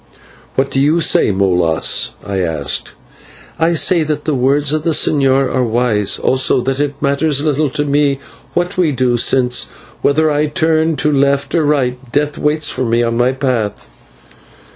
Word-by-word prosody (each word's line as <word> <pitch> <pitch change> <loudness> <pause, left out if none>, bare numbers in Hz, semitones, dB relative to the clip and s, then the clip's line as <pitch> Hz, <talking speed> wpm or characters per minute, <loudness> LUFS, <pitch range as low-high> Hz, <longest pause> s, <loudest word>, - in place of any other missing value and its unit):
"What 135 +1 0
do 135 - 0
you 150 +5 +2
say, 160 - +2
Molas?" 90 -5 +1
I 100 -1 -3
asked. 80 -5 -3 0.7
"I 165 +1 +2
say 170 +1 +2
that 150 -1 -3
the 155 - 0
words 140 +3 +1
of 155 - 0
the 160 0 +1
señor 135 -2 +1
are 130 - +1
wise, 115 -3 0
also 130 0 +2
that 135 +2 -2
it 145 -1 -2
matters 140 0 +1
little 150 -1 0
to 145 +3 -2
me 145 -1 +1 0.4
what 175 +2 -1
we 170 -4 +2
do, 125 -2 0
since 125 +1 +1 0.4
whether 155 +2 +2
I 150 +1 +1
turn 160 +1 +1
to 150 0 0
left 140 0 +1
or 165 - +2
right 130 -4 0
death 145 +1 -1
waits 150 0 0
me 120 -1 +1
on 115 0 -1
my 120 +2 +2
path." 125 - -2
140 Hz, 165 wpm, -15 LUFS, 125-150 Hz, 0.7 s, you